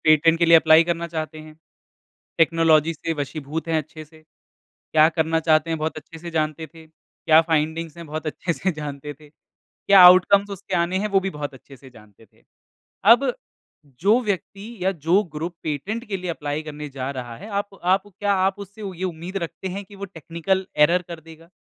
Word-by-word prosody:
Patent 160 +1 +4
के 170 - +4
लिए 165 0 +8
apply 160 0 +6
करना 170 0 -2
चाहते 155 -1 -5
हैं। 155 0 -13 0.8
टेक्नोलॉज़ी 165 -1 +3
से 165 +1 -4
वशीभूत 150 +2 -5
हैं 160 - +2
अच्छे 155 +1 -6
से। 155 +1 -20 0.7
क्या 155 0 +6
करना 160 0 0
चाहते 155 0 +2
हैं 165 - -1
बहुत 155 +1 -3
अच्छे 155 +1 -10
से 170 +1 -8
जानते 155 0 -2
थे। 160 -1 -14
क्या 155 0 +1
फ़ाइंडिंग्स 160 0 -1
है 170 - -8
बहुत 155 0 -6
अच्छे 170 +3 -2
से 185 +3 -2
जानते 150 -1 -7
थे। 150 +1 -19
क्या 195 +5 0
आउटकम्स 190 +3 +6
उसके 195 -1 -6
आने 175 +2 0
हैं 210 +2 -1
वो 195 -1 +2
भी - - -1
बहुत 150 -3 -6
अच्छे 135 +1 -15
से 130 +1 -16
जानते 105 -2 -19
थे। - - -31 0.7
अब 255 +2 +3 0.7
जो 210 +7 +4
व्यक्ति 205 +2 -5
या 190 - +2
जो 170 +4 +2
ग्रुप, 165 +3 -4
पेटेंट 190 - -4
के 200 - -2
लिए 180 -1 -5
एप्लाई 150 -1 -4
करने 150 -1 -7
जा 135 0 -5
रहा 120 -2 -7
है, 200 - -11
आप 205 -1 -2 0.2
आप 190 +2 +2
क्या 205 +1 -2
आप 195 +1 -1
उससे 200 +2 -10 0.2
ये 185 - -3
उम्मीद 175 +1 -5
रखते 170 +3 -6
हैं 200 +1 -5
कि 200 - -16
वो 200 - -6
टेक्निकल 185 +1 -3
एरर 170 +4 +4
कर 170 -2 -8
देगा? 165 +1 -16
165 Hz, 195 wpm, -22 LUFS, 155-185 Hz, 0.8 s, लिए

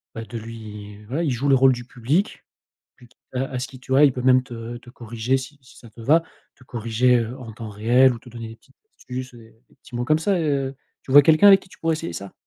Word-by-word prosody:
bah, 115 0 -6
de 115 +3 -7
lui 105 -2 -10
voilà, 140 +9 -3
il 150 - 0
joue 130 +4 -2
le 135 - +4
rôle 130 0 +5
du 120 0 -7
public, 135 - -2 0.5
puis 120 - -18
t - - -30 0.2
heu, 130 +1 0
à 130 - -4
ce 130 - -3
qu'il 130 -1 -14
tu 130 - -7
vois, 140 +3 +6
il 135 - +5
peut 125 - -5
même 130 0 +5
te 120 -1 -8
te 120 0 -14
corriger 120 +1 -2
si 135 +2 -10
si 125 - -18
ça 115 - -14
te 110 +2 -16
va, 160 +7 +4 0.3
te 130 - -23
corriger, 120 +2 +1
heu, 120 +4 -5
en 115 -3 -9
temps 110 -1 -8
réel 120 +5 +4
ou 115 - -7
te 125 - -16
donner 115 -1 -8
des 115 - -11
petites - - -29 0.2
astuces 130 0 -7
et 115 -1 -16
des - - -24
petits 120 - -11
mots 120 - -2
comme 155 +3 +2
ça 190 +2 0
et 165 - -1
heu 135 -2 -1 0.3
tu 130 - -7
vois 145 0 +9
quelqu'un 160 +7 +5
avec 195 -1 +8
qui 185 - -19
tu - - -17
pourrais 165 -1 0
essayer 120 - -5
ça? 95 +3 -8
125 Hz, 280 wpm, -22 LUFS, 115-135 Hz, 0.5 s, vois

